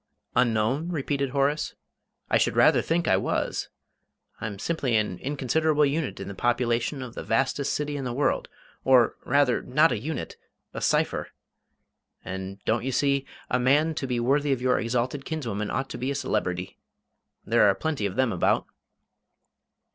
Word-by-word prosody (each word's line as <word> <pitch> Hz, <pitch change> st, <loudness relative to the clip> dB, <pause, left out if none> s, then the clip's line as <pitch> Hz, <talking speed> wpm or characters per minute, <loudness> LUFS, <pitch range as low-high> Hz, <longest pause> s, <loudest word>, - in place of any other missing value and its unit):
"Unknown?" 125 Hz, +6 st, +2 dB
repeated 140 Hz, -4 st, -1 dB
Horace; 140 Hz, +3 st, 0 dB, 0.5 s
"I -, -, +3 dB
should -, -, +1 dB
rather -, -, +5 dB
think 170 Hz, +1 st, 0 dB
I 95 Hz, -, +4 dB
was! -, -, -1 dB, 0.7 s
I'm 105 Hz, -2 st, -4 dB
simply 135 Hz, 0 st, -1 dB
an 105 Hz, -5 st, 0 dB
inconsiderable 150 Hz, +2 st, +1 dB
unit 145 Hz, +1 st, -2 dB
in -, -, -6 dB
the 100 Hz, -, -5 dB
population 120 Hz, +4 st, 0 dB
of 120 Hz, -2 st, -8 dB
the -, -, -6 dB
vastest 135 Hz, +4 st, 0 dB
city 150 Hz, 0 st, -2 dB
in 135 Hz, -, -4 dB
the 125 Hz, -, -3 dB
world; 140 Hz, +4 st, 0 dB, 0.4 s
or, 130 Hz, -3 st, +5 dB
rather, 140 Hz, -3 st, +3 dB
not 150 Hz, +6 st, +3 dB
a -, -, -1 dB
unit 150 Hz, +7 st, -5 dB, 0.4 s
a -, -, -5 dB
cipher. -, -, +1 dB, 1.0 s
And, 95 Hz, +1 st, -5 dB
don't 115 Hz, +1 st, +1 dB
you 135 Hz, -, -1 dB
see, 140 Hz, +1 st, +1 dB, 0.2 s
a 125 Hz, -, +1 dB
man 145 Hz, +6 st, +3 dB
to 135 Hz, -, -3 dB
be 125 Hz, -1 st, -1 dB
worthy 140 Hz, +4 st, +2 dB
of 135 Hz, -, +1 dB
your 125 Hz, 0 st, +2 dB
exalted 125 Hz, +4 st, -1 dB
kinswoman 115 Hz, -10 st, -3 dB
ought 135 Hz, +2 st, -2 dB
to -, -, -6 dB
be 130 Hz, -, -2 dB
a 140 Hz, -, -1 dB
celebrity. 95 Hz, -9 st, -2 dB, 0.7 s
There 115 Hz, -1 st, +4 dB
are 95 Hz, -, +2 dB
plenty 135 Hz, -2 st, -1 dB
of 95 Hz, -, -7 dB
them 130 Hz, -2 st, +2 dB
about." 90 Hz, -, +1 dB
130 Hz, 165 wpm, -26 LUFS, 115-145 Hz, 1.0 s, rather